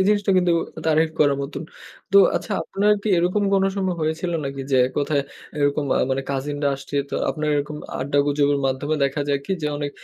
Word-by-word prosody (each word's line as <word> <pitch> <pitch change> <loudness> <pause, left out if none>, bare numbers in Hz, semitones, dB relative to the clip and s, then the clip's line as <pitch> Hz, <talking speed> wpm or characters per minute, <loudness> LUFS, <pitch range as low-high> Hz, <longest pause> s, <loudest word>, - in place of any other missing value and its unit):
এই - - +3
জিনিসটা 205 -1 +2
কিন্তু 180 -1 +2 0.3
তারিফ 160 0 +3
করার 145 -2 +4
মতন। 140 +3 -5 0.5
তো 200 - +8 0.2
আচ্ছা, - - -4
আপনার 205 +2 +2
কি 215 - -2
এরকম 180 +4 +1
কোন 195 - +3
সময় 190 -2 0
হয়েছিল 160 +3 -1
নাকি, 135 0 -4
যে 135 - +3
এককথায় 145 +1 0 0.4
এরকম 145 +1 +1
আ - - +2
মানে 135 +1 0
কাজিনরা 145 +1 -1
আসছে, 135 +1 -6
তো - - -4 0.2
আপনার 155 -1 -3
এরকম 150 +1 -3 0.2
আড্ডা 140 +2 0
গুজবের 145 0 +2
মাধ্যমে 135 +3 -1
দেখা 140 +1 -1
যাক 140 -1 +1
কি, - - -1
যে - - 0
অনেক 145 -1 -3
145 Hz, 195 wpm, -22 LUFS, 140-175 Hz, 0.5 s, তো